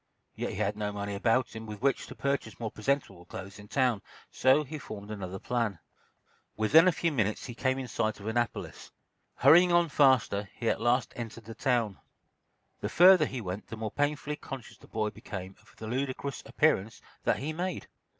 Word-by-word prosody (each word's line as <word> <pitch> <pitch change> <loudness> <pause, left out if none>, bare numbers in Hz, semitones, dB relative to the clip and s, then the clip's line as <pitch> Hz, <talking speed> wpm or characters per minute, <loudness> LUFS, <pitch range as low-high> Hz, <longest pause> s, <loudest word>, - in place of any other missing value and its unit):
Yet - - -3
he - - -5
had 105 +1 0
no 105 -1 -2
money 100 0 -4
about 115 +5 +1
him 110 0 -7
with 105 -1 -8
which 140 -2 +1
to - - -9
purchase 140 -5 -2
more 110 -2 -3
presentable 105 -6 -1
clothes 95 +3 -9
in 105 - -12
town. 125 -4 +1 0.3
So 135 +4 +4
he 150 +2 -7
formed 105 -5 -8
another 95 -3 -5
plan. 115 -2 -1 0.8
Within 150 +11 +6
a - - +6
few 165 +1 0
minutes 110 -7 0
he 120 - -6
came 130 +2 0
in 130 -1 -4
sight 110 -2 -1
of 100 - -10
Annapolis. 120 +2 -2 0.5
Hurrying 175 +7 +7
on 175 -1 +4
faster, 130 -8 +3
he 115 - -4
at - - -3
last 120 0 +2
entered 115 -1 -7
the 115 - -8
town. 115 -4 0 0.8
The - - -3
further 180 -3 +7
he 130 - -5
went 95 0 -5
the 110 - -7
more 110 -1 -4
painfully 145 0 -1
conscious 135 -5 -9
the - - -16
boy 110 -1 -1
became 95 -2 -8
of 105 -1 -22
the 110 - -7
ludicrous 130 +3 -3
appearance 115 -8 +1 0.3
that - - +3
he 150 +4 -3
made. 180 +1 -3
115 Hz, 190 wpm, -30 LUFS, 105-140 Hz, 0.8 s, Hurrying